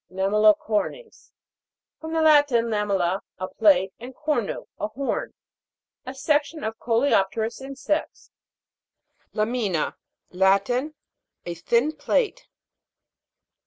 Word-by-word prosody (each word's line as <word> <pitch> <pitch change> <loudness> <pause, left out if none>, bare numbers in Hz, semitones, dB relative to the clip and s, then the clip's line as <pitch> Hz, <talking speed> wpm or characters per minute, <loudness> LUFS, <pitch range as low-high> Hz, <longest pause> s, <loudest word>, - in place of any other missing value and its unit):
LAMEL'LICORNES. 210 - +1 0.7
From 320 0 -6
the 325 -1 +2
Latin, 290 -6 +5
lamella, 195 -3 0 0.2
a 185 - -4
plate, 190 -1 +3
and 250 +2 -9
cornu, 295 -9 -2
a 210 - -1
horn. 260 +6 -3 0.7
A 260 - -6
section 295 +2 0
of 220 0 -4
coleopterous 225 -2 +1
insects. 275 +3 -4 1.0
LA'MINA. 215 -7 -1 0.4
Latin. 200 +10 +2 0.5
A 175 - -4
thin 235 - +1
plate. 430 +11 -1
235 Hz, 90 wpm, -24 LUFS, 200-290 Hz, 1.0 s, Latin